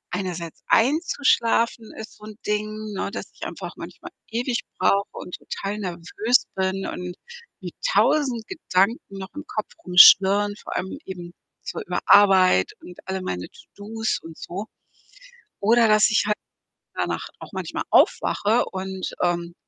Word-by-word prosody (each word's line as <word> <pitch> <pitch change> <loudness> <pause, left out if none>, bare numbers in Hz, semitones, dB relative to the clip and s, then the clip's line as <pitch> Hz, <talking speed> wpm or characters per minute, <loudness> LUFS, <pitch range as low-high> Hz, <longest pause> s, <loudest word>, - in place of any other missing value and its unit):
einerseits 175 -3 -5
einzuschlafen 235 -4 +2
ist 220 - -9
so 210 - -13
'n 215 0 -10
Ding, 210 0 0 0.3
ne, 195 - -3
dass 210 - -7
ich - - -24
einfach - - -7
manchmal - - -10 0.2
ewig 240 +2 -1 0.2
brauche 200 0 +2
und 180 - -9
total 200 +2 -5
nervös 190 +6 0
bin 190 0 -1
und 180 0 -5 0.5
mir - - -6 0.2
1.000 255 -7 +2
Gedanken 200 - 0
noch 190 0 -8
im 295 - -7
Kopf 215 - -4
rumschwirren, 195 +3 +7
vor - - -7
allem 190 +10 -4
eben 175 -2 -8 0.3
so - - -5
über - - -3
Arbeit 190 - +5
und 180 - -12
alle 190 0 -3
meine 90 - -4
To-do's 220 +2 -5
und 165 -1 -11
so 200 +5 -6 0.9
oder, 230 +3 +5
dass 215 0 +5
ich 215 - +3
halt 210 - +1 0.6
danach - - -2
auch - - -11
manchmal - - -4
aufwache 220 +4 +3
und, 190 0 -4
ähm 175 -1 -1
200 Hz, 145 wpm, -23 LUFS, 185-225 Hz, 0.9 s, rumschwirren